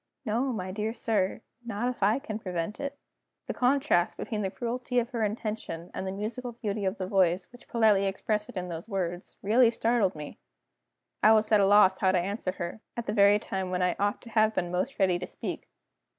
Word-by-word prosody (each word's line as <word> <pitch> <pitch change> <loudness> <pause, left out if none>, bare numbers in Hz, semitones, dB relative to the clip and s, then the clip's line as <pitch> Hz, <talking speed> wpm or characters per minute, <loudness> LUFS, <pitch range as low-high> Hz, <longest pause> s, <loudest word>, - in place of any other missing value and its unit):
"No, 240 +5 0
my 185 -5 -4
dear 215 +3 -3
sir 210 -5 0 0.2
not 230 0 -2
if 250 -3 -4
I 210 +4 +4
can 225 -6 -5
prevent 180 0 -4
it." 280 0 -4 0.5
The - - -3
contrast 255 -8 +2
between 215 -2 -3
the 195 - -1
cruelty 240 +5 -3
of 240 +1 +1
her 235 -3 -2
intention, 210 -5 -3
and 190 - -4
the - - -2
musical 235 +5 -4
beauty 210 -3 -3
of 190 +3 -1
the 185 - -3
voice 185 -2 +2
which 245 - -16
politely 215 -4 +3
expressed 210 +2 -2
it 235 - -8
in 180 0 -3
those 170 +4 -7
words, 180 -3 -3
really 230 +4 +5
startled 230 -5 +1
me. 150 -1 -8 0.8
I 220 - +7
was 215 0 +2
at 210 -2 +6
a 195 - +4
loss 195 -2 +6
how 190 -1 +3
to 185 - +3
answer 190 +1 -2
her, 175 +4 -5 0.2
at 235 - -3
the 210 - -2
very 200 -1 +6
time 190 -2 -4
when 180 0 0
I 180 -1 +1
ought 205 +1 0
to 235 - -11
have 220 0 +3
been 175 -1 -1
most 185 +10 -2
ready 185 -3 +2
to 180 - -5
speak. - - -6
210 Hz, 215 wpm, -28 LUFS, 185-230 Hz, 0.8 s, I